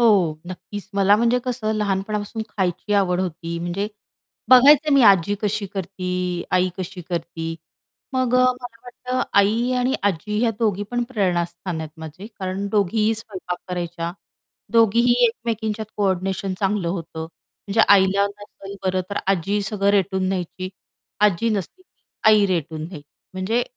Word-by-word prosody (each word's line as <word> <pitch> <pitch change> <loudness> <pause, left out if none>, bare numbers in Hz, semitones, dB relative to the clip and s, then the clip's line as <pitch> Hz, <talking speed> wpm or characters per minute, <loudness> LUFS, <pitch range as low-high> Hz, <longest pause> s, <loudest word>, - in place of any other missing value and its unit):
हो 190 -9 +4
नक्कीच. 190 +2 -8
मला 200 +1 +5
म्हणजे 235 +2 +2
कसं 240 -4 -1
लहानपणापासून 210 +1 -2
खायची 190 0 -2
आवड 185 -3 +2
होती, 170 -2 -4
म्हणजे 175 +4 -2 0.6
बघायचं 285 +4 +7
मी 275 -1 +6
आजी 200 -2 +5
कशी 210 0 -1
करती, 180 -2 -3
आई 185 0 +3
कशी 185 0 -5
करती, 165 -2 -4 0.6
मग 255 -1 +1
अ, - - +5 0.2
मला 245 -2 -9
वाटतं 250 +1 -4 0.2
आई 225 +5 +3
आणि 250 +2 +1
आजी 205 +2 -1
या 235 - +3
दोघी 205 -4 +1
पण 245 0 0
प्रेरणास्थान 175 -6 -1
आहेत 160 -1 -6
माझे, 160 +5 -9
कारण 190 +1 -3
दोघीही 215 +2 +2
स्वयंपाक 185 -5 -5
करायच्या. 170 -1 -3 0.6
दोघीही 230 +1 +4
एकमेकींच्यात 220 -2 -3
कोऑर्डिनेशन 190 -1 -1
चांगलं 195 -3 0
होतं 170 -2 -5
म्हणजे 195 +6 -4
आईला 200 0 +5
नसेल 200 -1 -10
बरं, 185 0 +1
तर 200 - -2
आजी 195 +2 +1
सगळं 200 0 +1
रेटून 190 -1 +1
घ्यायची. 185 0 -3 0.5
आजी 210 +1 +3
नसली 210 - -3
की 370 - -48 0.3
आई 210 -2 +6
रेटून 160 -4 -2
घ्यायची. 155 -5 -10 0.3
म्हणजे 190 +6 0
200 Hz, 140 wpm, -22 LUFS, 180-215 Hz, 0.6 s, बघायचं